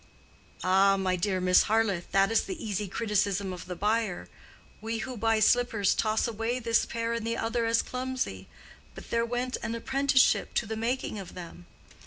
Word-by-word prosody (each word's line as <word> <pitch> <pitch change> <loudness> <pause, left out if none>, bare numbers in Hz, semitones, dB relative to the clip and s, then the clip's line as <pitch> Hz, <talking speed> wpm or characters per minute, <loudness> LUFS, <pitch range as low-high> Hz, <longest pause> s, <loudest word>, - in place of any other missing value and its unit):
"Ah, 195 +1 +4
my 185 -1 0
dear 185 +1 -1
Miss 180 0 +4
Harleth, 215 -5 +1
that 195 +2 +3
is 225 - +3
the 375 - -5
easy 210 - -3
criticism 200 -2 -1
of 180 - -9
the 180 - -5
buyer. 210 -1 -1 0.5
We 225 +1 -3
who 260 -1 -6
buy 225 0 +1
slippers 220 -3 +3
toss 215 +1 0
away 230 +2 -2
this 230 -2 +1
pair 230 0 -2
and 230 -1 -3
the 230 0 -1
other 230 +1 -1
as 230 0 +2
clumsy; 255 0 -4 0.5
but - - -11
there 230 0 +1
went 245 +2 -2
an 230 - -3
apprenticeship 270 +3 +2
to - - +1
the 220 +1 -4
making 230 -1 -2
of 190 - -9
them. 175 0 -10
225 Hz, 180 wpm, -28 LUFS, 195-235 Hz, 0.5 s, Ah